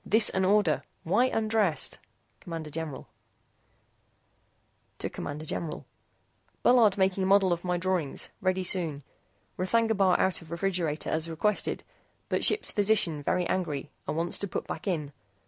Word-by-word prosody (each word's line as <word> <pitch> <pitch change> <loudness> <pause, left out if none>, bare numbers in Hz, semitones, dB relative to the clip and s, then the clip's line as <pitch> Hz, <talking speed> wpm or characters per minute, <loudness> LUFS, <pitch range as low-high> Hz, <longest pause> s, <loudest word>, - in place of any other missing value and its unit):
THIS 220 +1 +5
AN 190 0 +1
ORDER! 200 -4 +3 0.2
WHY 210 +9 +3
UNDRESSED? 215 -8 +1 0.5
CMD 165 -3 -5
GENERAL 155 -3 -5 1.9
CMD 150 +2 -5
GENERAL 155 0 -4 0.8
BULLARD 230 -5 +5
MAKING 190 0 +1
MODEL 195 -2 +4
OF 170 - -4
MY 180 -1 0
DRAWINGS. 180 -5 -1
READY 185 0 +1
SOON. 165 -6 0 0.6
R'THAGNA 225 +4 +2
BAR 190 -2 +3
OUT 190 -1 +1
OF 165 - -14
REFRIGERATOR 170 -3 -1
AS 160 +1 0
REQUESTED 195 +6 -1 0.5
BUT - - 0
SHIPS 425 - +3
PHYSICIAN 200 -7 +2
VERY 180 +5 0
ANGRY 155 -7 -2 0.2
AND - - -2
WANTS 170 +1 0
TO 200 - -3
PUT - - -4
BACK - - -6
IN. 150 -6 -2
180 Hz, 135 wpm, -28 LUFS, 160-200 Hz, 1.9 s, THIS